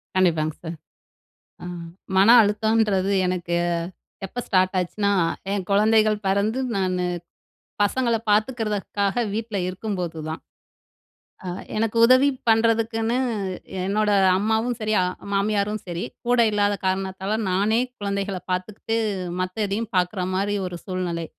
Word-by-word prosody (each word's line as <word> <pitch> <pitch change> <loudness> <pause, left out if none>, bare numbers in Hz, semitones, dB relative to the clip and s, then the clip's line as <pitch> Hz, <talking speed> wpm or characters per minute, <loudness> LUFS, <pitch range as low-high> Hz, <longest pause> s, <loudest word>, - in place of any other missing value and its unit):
கண்டிப்பாங் 160 -4 +2
சார். 165 +1 -5 0.9
அ - - -6 0.5
மன 195 +3 +6
அழுத்தம்ன்றது 210 -2 +1
எனக்கு 180 -1 -2 0.7
எப்ப 245 +6 -5
ஸ்டார்ட் 185 -1 +2
ஆச்சுனா? 200 +3 0 0.4
என் 200 -2 -1
குழந்தைகள் 215 +1 +4
பிறந்து 200 +5 +1 0.2
நானு, 185 -2 0 0.8
பசங்கள 235 +3 +1
பார்த்துக்கிறதுக்காக 210 -1 0
வீட்ல 220 -1 -3
இருக்கும்போது 185 -4 -4
தான். 160 - -5 1.0
அ - - -5 0.3
எனக்கு 225 +1 0
உதவி 255 +3 +5 0.2
பண்றதுக்குன்னு, 225 +1 +2 0.7
என்னோட 210 +2 +1 0.3
அம்மாவும் 220 +4 0
சரி 215 0 0
அ - - +1 0.3
மாமியாரும் 205 +1 0
சரி, 175 0 -4 0.2
கூட 245 0 +3
இல்லாத 205 -1 +2
காரணத்தால 190 +2 -1
நானே 205 +5 +2 0.2
குழந்தைகள 200 -1 -2
பார்த்துக்கிட்டு, 205 +5 -2 0.4
மத்ததையும் 205 +4 -2
பார்க்குற 180 +1 0
மாரி 200 +2 0
ஒரு 175 -1 -6
சூழ்நிலை. 180 -3 -3
205 Hz, 110 wpm, -23 LUFS, 185-220 Hz, 1.0 s, மன